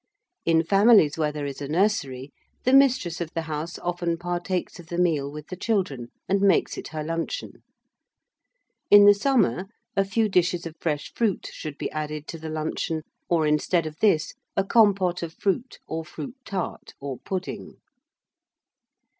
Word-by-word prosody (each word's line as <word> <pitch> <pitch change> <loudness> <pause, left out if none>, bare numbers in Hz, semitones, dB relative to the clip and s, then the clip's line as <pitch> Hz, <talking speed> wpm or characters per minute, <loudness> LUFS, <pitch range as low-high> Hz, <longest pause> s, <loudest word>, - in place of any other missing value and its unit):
In 165 -1 +4
families 195 -3 +5
where 155 -2 0
there 150 -1 -4
is 140 0 -6
a 140 - -3
nursery, 145 -7 0 0.3
the 255 - +2
mistress 255 - +4
of 170 - -3
the 165 - -1
house 160 +1 -4
often 175 -1 -2
partakes 175 +1 -3
of 170 - -12
the 170 - -4
meal 155 -6 +1
with 150 0 -9
the 185 - -5
children, 180 - -1 0.2
and 195 +1 +2
makes 200 -1 +3
it - - -6
her 155 -1 -5
luncheon. 165 - -4 1.3
In 205 0 +9
the 205 - +9
summer, 200 - +1 0.3
a 195 - +4
few 215 +3 +1
dishes 180 -2 +1
of 165 - -6
fresh 150 -3 -2
fruit 220 -6 -1
should 150 -2 -7
be - - -4
added 150 0 -4
to 165 - -6
the 160 0 -6
luncheon, 155 0 -2 0.3
or, 165 -3 +3
instead 150 +3 +2
of 155 0 -7
this, 165 -8 +2 0.2
a 195 - +4
compote 195 -4 +3
of 165 -1 -5
fruit 230 +6 -1
or 160 0 -4
fruit 240 - -8
tart, 190 -3 -5
or 140 -3 -5
pudding. 190 -1 -5
170 Hz, 165 wpm, -25 LUFS, 155-195 Hz, 1.3 s, In